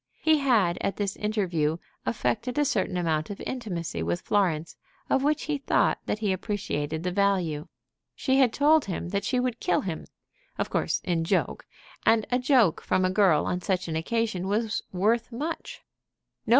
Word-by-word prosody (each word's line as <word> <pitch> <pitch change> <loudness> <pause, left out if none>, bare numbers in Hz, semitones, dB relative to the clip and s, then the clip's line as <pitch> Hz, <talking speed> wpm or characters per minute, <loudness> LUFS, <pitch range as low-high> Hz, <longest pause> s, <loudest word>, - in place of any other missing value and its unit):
He 315 -1 +4
had 215 -11 +2
at 195 - -1
this 200 -2 -1
interview 180 -8 0 0.3
affected 235 +3 -1
a 295 - +3
certain 195 -6 0
amount 160 -3 0
of 205 - -6
intimacy 175 - -4
with 85 +1 -1
Florence 170 -6 0 0.4
of 265 - +3
which 300 +2 +1
he 300 -2 -2
thought - - +2
that - - 0
he 210 -3 0
appreciated 170 -6 -3
the 180 - -1
value. 180 -5 +1 0.5
She 265 -1 +1
had 255 -4 +5
told 300 +3 +4
him 175 -2 -4
that 200 +1 -1
she 250 +4 0
would 250 -2 -1
kill 175 - +1
him, 170 -4 -5 0.5
of - - -2
course - - 0
in 170 -3 0
joke; 165 - -1 0.4
and 225 -1 +4
a 250 - +3
joke 250 - +3
from 185 - +1
a 185 - +1
girl 185 -6 +4
on 180 - -1
such 185 -2 -1
an 160 - -3
occasion 190 +2 -1
was 215 +2 0
worth 225 +6 +1
much. 300 +8 -5
200 Hz, 175 wpm, -27 LUFS, 175-235 Hz, 0.5 s, had